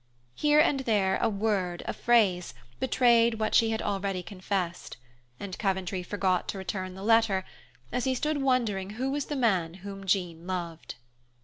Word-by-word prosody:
Here 295 Hz, -, +3 dB
and 300 Hz, -3 st, +4 dB
there 205 Hz, -7 st, +1 dB
a 230 Hz, -, +1 dB
word, 200 Hz, -4 st, -1 dB
a -, -, -2 dB
phrase, 200 Hz, -, +2 dB, 0.2 s
betrayed 235 Hz, -3 st, +4 dB
what 215 Hz, -1 st, -1 dB
she 225 Hz, -, +5 dB
had 220 Hz, 0 st, -2 dB
already 195 Hz, -2 st, -2 dB
confessed, 185 Hz, -2 st, -4 dB, 0.4 s
and 195 Hz, -2 st, -6 dB
Coventry 190 Hz, -2 st, -1 dB
forgot 185 Hz, 0 st, 0 dB
to -, -, -4 dB
return 185 Hz, -1 st, -4 dB
the 190 Hz, -, -8 dB
letter, 220 Hz, -4 st, +3 dB, 0.5 s
as 250 Hz, -, -1 dB
he 260 Hz, -1 st, +1 dB
stood 300 Hz, +2 st, -1 dB
wondering 230 Hz, -8 st, +1 dB
who 265 Hz, +2 st, -1 dB
was 285 Hz, 0 st, -2 dB
the 295 Hz, -, -4 dB
man 190 Hz, -10 st, +1 dB
whom 195 Hz, -1 st, -7 dB
Jean 175 Hz, -3 st, -1 dB
loved. 170 Hz, -3 st, -5 dB
200 Hz, 165 wpm, -28 LUFS, 185-235 Hz, 0.5 s, she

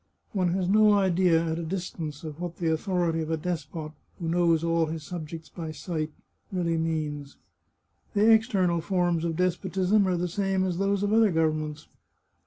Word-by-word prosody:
" -, -, -45 dB
One 185 Hz, -3 st, +1 dB
has 185 Hz, -2 st, 0 dB
no 210 Hz, +2 st, +5 dB
idea, 180 Hz, -4 st, +3 dB
at 160 Hz, 0 st, -2 dB
a -, -, -3 dB
distance, 165 Hz, -4 st, -5 dB
of 155 Hz, -1 st, -7 dB
what 175 Hz, -1 st, -5 dB
the 165 Hz, -2 st, 0 dB
authority 170 Hz, -1 st, 0 dB
of 155 Hz, -, -4 dB
a 160 Hz, -, 0 dB
despot, 155 Hz, -2 st, -4 dB, 0.3 s
who 170 Hz, -, -4 dB
knows 170 Hz, -1 st, +3 dB
all 165 Hz, -1 st, +2 dB
his 160 Hz, 0 st, -5 dB
subjects 160 Hz, 0 st, -7 dB
by 165 Hz, -3 st, -7 dB
sight, 155 Hz, -1 st, -4 dB, 0.4 s
really 175 Hz, -3 st, 0 dB
means. 150 Hz, -3 st, -3 dB, 0.8 s
The 215 Hz, +2 st, +5 dB
external 185 Hz, -6 st, +2 dB
forms 175 Hz, -2 st, 0 dB
of 165 Hz, -1 st, -1 dB
despotism 185 Hz, +3 st, +1 dB
are 180 Hz, -1 st, +1 dB
the 175 Hz, +1 st, -1 dB
same 190 Hz, +1 st, 0 dB
as 180 Hz, -1 st, -2 dB
those 200 Hz, 0 st, +1 dB
of 205 Hz, +1 st, +1 dB
other 225 Hz, -1 st, +5 dB
governments. 155 Hz, -2 st, -1 dB
170 Hz, 180 wpm, -27 LUFS, 160-185 Hz, 0.8 s, no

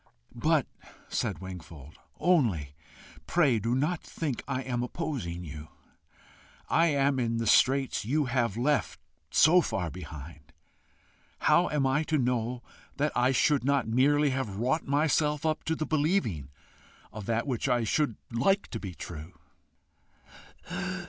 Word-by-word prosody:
"But," -, -, +2 dB, 0.4 s
said -, -, -1 dB
Wingfold 80 Hz, -5 st, -10 dB, 0.2 s
"only 110 Hz, -, +2 dB, 0.5 s
pray 145 Hz, -10 st, +3 dB
do 115 Hz, +4 st, 0 dB
not 155 Hz, +6 st, 0 dB
think 145 Hz, -7 st, -4 dB
I 130 Hz, -1 st, -2 dB
am 125 Hz, -2 st, -2 dB
opposing 125 Hz, -, -4 dB
you; 75 Hz, -1 st, -8 dB, 1.0 s
I 165 Hz, +1 st, +3 dB
am 140 Hz, -3 st, +2 dB
in 115 Hz, -2 st, 0 dB
the 115 Hz, -, -1 dB
straits 130 Hz, +3 st, +3 dB
you 145 Hz, +7 st, +1 dB
have 120 Hz, -4 st, 0 dB
left 130 Hz, -2 st, 0 dB, 0.3 s
so 170 Hz, -, +6 dB
far 90 Hz, -, -2 dB
behind: 75 Hz, -3 st, -10 dB, 0.9 s
how 175 Hz, -, +4 dB
am 145 Hz, -2 st, +1 dB
I 135 Hz, +3 st, +2 dB
to 155 Hz, -, +1 dB
know 125 Hz, -1 st, -1 dB, 0.3 s
that 150 Hz, +1 st, +1 dB
I 125 Hz, +2 st, +3 dB
should 140 Hz, +1 st, +2 dB
not 140 Hz, -1 st, +1 dB
merely 140 Hz, +5 st, +3 dB
have 130 Hz, -7 st, -3 dB
wrought 130 Hz, +8 st, 0 dB
myself 150 Hz, +1 st, +1 dB
up 155 Hz, 0 st, 0 dB
to 160 Hz, -, 0 dB
the 155 Hz, -, -2 dB
believing 145 Hz, -, 0 dB, 0.6 s
of 105 Hz, -2 st, -7 dB
that 115 Hz, 0 st, 0 dB
which 135 Hz, -1 st, -1 dB
I 120 Hz, -2 st, +2 dB
should 120 Hz, +2 st, +1 dB, 0.2 s
like 195 Hz, +13 st, +1 dB
to 115 Hz, -, -5 dB
be 95 Hz, -4 st, -7 dB
true?" 80 Hz, +1 st, -8 dB
125 Hz, 140 wpm, -29 LUFS, 105-150 Hz, 1.0 s, so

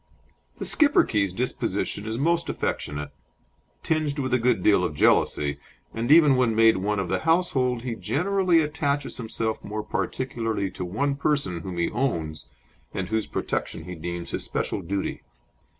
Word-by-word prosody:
The -, -, -4 dB
Schipperke's 105 Hz, -, +3 dB
disposition 110 Hz, -1 st, -2 dB
is 110 Hz, +1 st, -2 dB
most 170 Hz, +5 st, +1 dB
affectionate, 75 Hz, 0 st, -3 dB, 0.7 s
tinged 155 Hz, -3 st, 0 dB
with 130 Hz, -3 st, -2 dB
a 125 Hz, -, +4 dB
good 120 Hz, 0 st, +2 dB
deal 100 Hz, -4 st, +4 dB
of 75 Hz, -, -2 dB
jealousy, 70 Hz, -1 st, +2 dB, 0.3 s
and 115 Hz, +4 st, -1 dB
even 150 Hz, -4 st, +7 dB
when 125 Hz, -3 st, +2 dB
made 115 Hz, -2 st, +5 dB
one 105 Hz, +3 st, -1 dB
of 95 Hz, -2 st, -1 dB
the -, -, 0 dB
household 135 Hz, -8 st, +1 dB
he 125 Hz, -2 st, -3 dB
generally 165 Hz, -, +2 dB
attaches 145 Hz, -2 st, -1 dB
himself 110 Hz, -1 st, -3 dB
more 105 Hz, +1 st, -4 dB
particularly 115 Hz, -7 st, -2 dB
to 90 Hz, -, -6 dB
one 140 Hz, +11 st, 0 dB
person, 140 Hz, -, 0 dB
whom 90 Hz, 0 st, -6 dB
he 85 Hz, -, 0 dB
"owns," 85 Hz, -, -2 dB, 0.5 s
and 95 Hz, -1 st, -3 dB
whose 110 Hz, 0 st, -1 dB
protection -, -, -3 dB
he 90 Hz, -, -7 dB
deems 85 Hz, +1 st, -5 dB
his -, -, -2 dB
special -, -, -2 dB
duty. 95 Hz, +3 st, -3 dB
115 Hz, 155 wpm, -25 LUFS, 95-140 Hz, 0.7 s, even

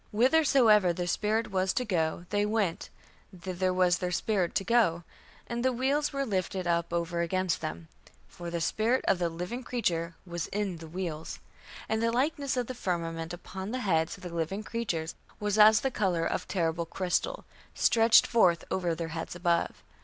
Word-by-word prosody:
Whithersoever 235 Hz, -, +4 dB
the 175 Hz, +1 st, -3 dB
spirit 215 Hz, +6 st, 0 dB
was 190 Hz, 0 st, +1 dB
to 250 Hz, -, -1 dB
go, 170 Hz, -4 st, -1 dB
they 205 Hz, 0 st, +2 dB
went, 210 Hz, -5 st, -1 dB, 0.5 s
thither 185 Hz, +1 st, -1 dB
was 180 Hz, -1 st, +2 dB
their 180 Hz, -1 st, -2 dB
spirit 185 Hz, 0 st, 0 dB
to -, -, +1 dB
go; 195 Hz, -6 st, +2 dB, 0.4 s
and 235 Hz, 0 st, -3 dB
the 260 Hz, -, +3 dB
wheels 275 Hz, +4 st, 0 dB
were 275 Hz, -1 st, -1 dB
lifted 185 Hz, -3 st, -2 dB
up 170 Hz, -1 st, 0 dB
over 170 Hz, 0 st, -1 dB
against 185 Hz, +1 st, 0 dB
them; 80 Hz, +1 st, -5 dB, 0.4 s
for 175 Hz, -1 st, -8 dB
the 170 Hz, 0 st, -3 dB
spirit 225 Hz, +9 st, +1 dB
of 195 Hz, -, +3 dB
the 175 Hz, -1 st, +1 dB
living 180 Hz, +9 st, -5 dB
creature 170 Hz, -9 st, -1 dB
was 175 Hz, -2 st, -4 dB
in 200 Hz, -4 st, -2 dB
the 165 Hz, 0 st, -10 dB
wheels.... 165 Hz, -2 st, -5 dB, 0.5 s
And 220 Hz, 0 st, 0 dB
the 230 Hz, 0 st, +2 dB
likeness 280 Hz, +2 st, 0 dB
of 250 Hz, -, 0 dB
the 255 Hz, -, -5 dB
firmament 165 Hz, -6 st, -3 dB
upon 190 Hz, +2 st, -7 dB
the 255 Hz, +2 st, -3 dB
heads 160 Hz, -2 st, +1 dB
of 185 Hz, -, -16 dB
the 175 Hz, -2 st, -7 dB
living 170 Hz, +5 st, -2 dB
creature 215 Hz, -9 st, -2 dB, 0.3 s
was 210 Hz, 0 st, 0 dB
as 215 Hz, 0 st, +7 dB
the 270 Hz, -, 0 dB
colour 185 Hz, -7 st, 0 dB
of -, -, -2 dB
terrible 170 Hz, -2 st, -1 dB
crystal, 185 Hz, -, -2 dB, 0.3 s
stretched 225 Hz, 0 st, +5 dB
forth 180 Hz, -8 st, +3 dB
over 175 Hz, -3 st, 0 dB
their 165 Hz, 0 st, -4 dB
heads 165 Hz, +1 st, -5 dB
above.... 175 Hz, -1 st, 0 dB
185 Hz, 180 wpm, -29 LUFS, 170-225 Hz, 0.5 s, as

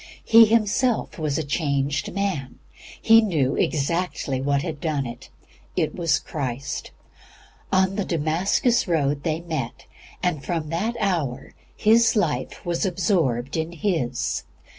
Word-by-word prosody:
He 225 Hz, 0 st, +8 dB
himself 225 Hz, 0 st, +1 dB
was 150 Hz, -3 st, -1 dB
a 160 Hz, -, -1 dB
changed 145 Hz, -1 st, -1 dB
man; 190 Hz, -9 st, -3 dB, 0.4 s
he 225 Hz, 0 st, +6 dB
knew 155 Hz, -, +1 dB
exactly 150 Hz, -3 st, -1 dB
what 140 Hz, +1 st, +1 dB
had 160 Hz, -4 st, -5 dB
done 150 Hz, -4 st, -1 dB
it; 120 Hz, +2 st, -9 dB, 0.5 s
IT 165 Hz, -4 st, 0 dB
WAS 165 Hz, -4 st, +1 dB
CHRIST. 135 Hz, -3 st, -4 dB, 0.8 s
On 190 Hz, 0 st, +2 dB
the 205 Hz, -, +1 dB
Damascus 175 Hz, -, +1 dB
road 145 Hz, -4 st, +1 dB
they 160 Hz, +1 st, -1 dB
met, 155 Hz, -8 st, -5 dB, 0.4 s
and 165 Hz, -6 st, 0 dB
from 165 Hz, -3 st, -3 dB
that 210 Hz, +9 st, -1 dB
hour 170 Hz, -, -1 dB, 0.2 s
his 225 Hz, +1 st, +4 dB
life 150 Hz, -, -1 dB
was 175 Hz, -1 st, -1 dB
absorbed 170 Hz, -, 0 dB
in 160 Hz, +1 st, -2 dB
His. 155 Hz, -9 st, -1 dB
165 Hz, 130 wpm, -24 LUFS, 140-190 Hz, 0.8 s, He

